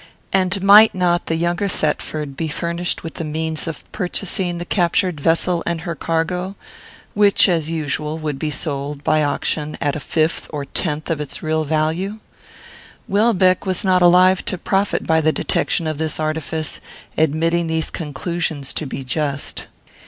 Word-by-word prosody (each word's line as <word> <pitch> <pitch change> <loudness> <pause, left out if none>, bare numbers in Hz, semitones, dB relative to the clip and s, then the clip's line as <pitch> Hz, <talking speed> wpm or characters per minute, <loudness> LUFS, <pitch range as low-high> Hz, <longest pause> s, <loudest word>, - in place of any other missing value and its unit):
and 190 0 +1
might 210 +2 +8
not 175 -1 +1
the 165 - 0
younger 175 +4 0
Thetford 150 -4 -2
be 160 +3 -2
furnished 170 +3 -2
with 165 - -6
the - - -5
means 160 +1 -3
of 165 - -5
purchasing 180 -2 -2
the 175 - -5
captured 175 -2 +1
vessel 170 +2 +2
and 170 -1 -1
her 170 0 -3
cargo, 180 +4 -2 0.6
which, 205 0 +5
as 165 -4 +1
usual, 155 -1 -2
would 150 -3 -4
be 155 - -1
sold 145 0 -3
by 155 +1 +3
auction 150 +1 -1
at 145 -3 0
a - - -3
fifth 155 +4 -1
or 145 -2 -4
tenth 155 +2 -2
of 155 -2 -1
its 145 - -5
real 155 0 0
value? 160 +7 -1 0.9
Welbeck 195 -3 +3
was 185 -1 0
not 185 -1 +4
alive 180 +1 +5
to 185 - -1
profit 195 +3 0
by 160 0 +3
the 155 0 +3
detection 165 - 0
of 155 -1 -3
this 160 0 -2
artifice, 155 0 -3 0.3
admitting 165 +2 +1
these 160 0 -1
conclusions 155 -1 -3
to 155 - -3
be 135 - -5
just. 140 +1 -3
165 Hz, 160 wpm, -20 LUFS, 155-180 Hz, 0.9 s, might